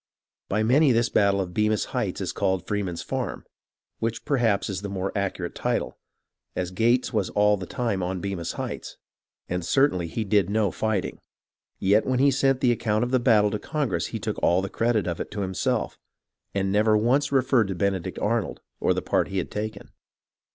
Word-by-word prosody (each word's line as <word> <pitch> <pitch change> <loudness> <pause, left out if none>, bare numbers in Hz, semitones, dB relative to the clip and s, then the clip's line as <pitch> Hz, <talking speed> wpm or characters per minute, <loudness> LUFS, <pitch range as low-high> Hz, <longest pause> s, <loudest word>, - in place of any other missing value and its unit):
By 110 +2 +1
many 135 +5 +4
this 115 0 +2
battle 100 -1 +3
of 90 -2 -5
Bemis 105 0 +1
Heights - - -1
is - - -2
called 95 -2 -1
Free 105 0 -1
man's 90 -4 -4
Farm, - - -4 0.5
which 115 0 -3
perhaps 115 -8 +1
is 95 -2 -3
the 100 - -5
more 95 +1 -3
accurate 100 -2 -2
title, - - -2 0.6
as 90 0 -2
Gates 120 +6 +2
was 105 -4 0
all 105 0 +3
the 95 -3 -7
time 115 -6 -1
on 90 +1 -2
Bemis 95 -3 -3
Heights, - - -6 0.5
and 90 0 -2
certainly 90 - +2
he 110 +7 -3
did 100 -3 +2
no 105 -2 +1
fighting; 110 -4 -2 0.6
yet 100 +3 +3
when 130 -1 +1
he 140 +2 +4
sent 135 0 +2
the 125 - +4
account 110 -1 0
of 125 - -2
the 130 - +3
battle 110 -4 +4
to 105 - -2
Congress 125 - -1
he - - -4
took - - -3
all 90 +2 +3
the 100 - -3
credit 115 -3 +1
of 85 -2 -3
it - - -5
to 100 -1 -3
him 95 0 -3
self, - - -1 0.6
and 95 -1 0
never 105 +1 +4
once 135 +6 +2
referred 130 -4 +3
to 95 - -3
Benedict 95 -1 -1
Arnold 110 -2 -1 0.2
or - - +2
the - - -2
part - - +1
he 95 - -4
had 90 - -2
taken. 110 +1 -5
105 Hz, 200 wpm, -25 LUFS, 95-120 Hz, 0.6 s, many